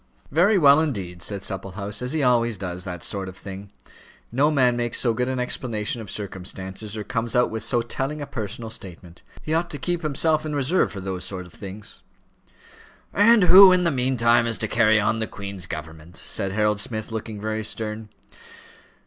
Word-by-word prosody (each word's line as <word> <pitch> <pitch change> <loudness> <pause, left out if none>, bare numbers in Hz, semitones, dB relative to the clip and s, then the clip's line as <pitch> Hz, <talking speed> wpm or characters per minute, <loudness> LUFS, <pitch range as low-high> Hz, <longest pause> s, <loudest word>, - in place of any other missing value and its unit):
"Very 180 +8 +4
well, 145 -3 +7
indeed," 95 - -3
said 100 +2 -1
Supplehouse; 100 +2 -4
"as 125 +1 -2
he 155 -2 0
always 120 -3 +2
does 90 -1 -5
those 90 -3 -6
sort 95 -2 -4
of 95 - -12
things. 100 0 -9 0.6
No 140 +5 +3
man 130 -5 +3
makes 120 -1 -1
so 120 -3 +2
good 125 +3 -1
an 130 -1 -2
explanation 115 -2 -2
of 105 - -9
circumstances, 95 +1 -5
or 105 - -4
comes 115 +3 -2
out 125 - +3
with 110 0 -3
so 115 +2 +1
telling 135 +5 -3
a 145 - -4
personal 110 -2 -5
statement. 90 -4 -10 0.2
He 155 - -2
ought 170 +1 0
to 145 - -5
keep 175 +5 -2
himself 155 0 +1
in 155 -1 -3
reserve 145 +6 +2
for 100 - -6
those 95 -1 -4
sort 95 -2 -5
of 90 - -16
things." 100 +1 -10 1.1
"And 215 +1 +5
who 190 +1 +10
in 180 -1 +3
the 170 - +2
meantime 120 -3 +2
is 115 - -1
to 110 - -1
carry 110 -1 +4
on 105 +2 +1
the 110 - -2
Queen's 100 -4 -7
government?" 80 +2 -8
said 95 - -2
Harold 105 0 +1
Smith, 110 0 -3
looking 110 -1 -5
very 110 +1 -3
stern. 110 0 -4
110 Hz, 190 wpm, -24 LUFS, 100-130 Hz, 1.1 s, who